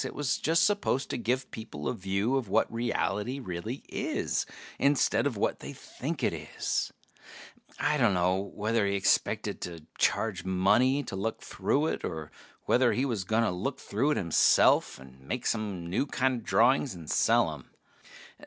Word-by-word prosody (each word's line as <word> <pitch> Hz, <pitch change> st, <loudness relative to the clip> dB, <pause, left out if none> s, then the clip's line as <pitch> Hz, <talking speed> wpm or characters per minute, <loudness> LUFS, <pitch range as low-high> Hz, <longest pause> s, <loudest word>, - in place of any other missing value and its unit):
It -, -, -6 dB
was 145 Hz, -3 st, 0 dB
just 165 Hz, +1 st, +3 dB
supposed 205 Hz, -10 st, 0 dB
to -, -, -2 dB
give 125 Hz, +3 st, -1 dB
people 110 Hz, -10 st, -6 dB
a -, -, 0 dB
view 100 Hz, +6 st, -1 dB
of 130 Hz, -7 st, -1 dB
what 110 Hz, +3 st, +2 dB
reality 115 Hz, 0 st, -1 dB
really 110 Hz, +3 st, -5 dB
is, -, -, -2 dB, 0.3 s
instead 140 Hz, 0 st, +3 dB
of 125 Hz, -7 st, -4 dB
what -, -, 0 dB
they -, -, -7 dB
think -, -, -6 dB
it -, -, +2 dB
is. -, -, -3 dB, 0.9 s
I 150 Hz, +1 st, +2 dB
dunno 95 Hz, -7 st, +2 dB
whether 105 Hz, +2 st, -1 dB
he 100 Hz, -, 0 dB
expected 95 Hz, -, +1 dB
to 85 Hz, -3 st, -7 dB
charge 100 Hz, -6 st, +1 dB
money 110 Hz, +9 st, +3 dB
to 95 Hz, -, -6 dB
look 110 Hz, +4 st, -3 dB
through 145 Hz, +3 st, 0 dB
it, -, -, -2 dB
or 80 Hz, -3 st, -5 dB, 0.3 s
whether 125 Hz, -1 st, +3 dB
he 130 Hz, -, 0 dB
was 110 Hz, -8 st, -2 dB
gonna 110 Hz, +1 st, +2 dB
look 95 Hz, +10 st, -3 dB
through 125 Hz, +9 st, 0 dB
it 150 Hz, -, +1 dB
himself 85 Hz, -4 st, +4 dB
and 65 Hz, 0 st, -15 dB
make 125 Hz, +1 st, -3 dB
some 105 Hz, -6 st, -2 dB
new 90 Hz, +11 st, -1 dB
kinda 130 Hz, -2 st, 0 dB
drawings 125 Hz, +2 st, +3 dB
and 85 Hz, -3 st, -10 dB
sell -, -, +3 dB
'em. -, -, -12 dB
110 Hz, 165 wpm, -29 LUFS, 95-130 Hz, 0.9 s, himself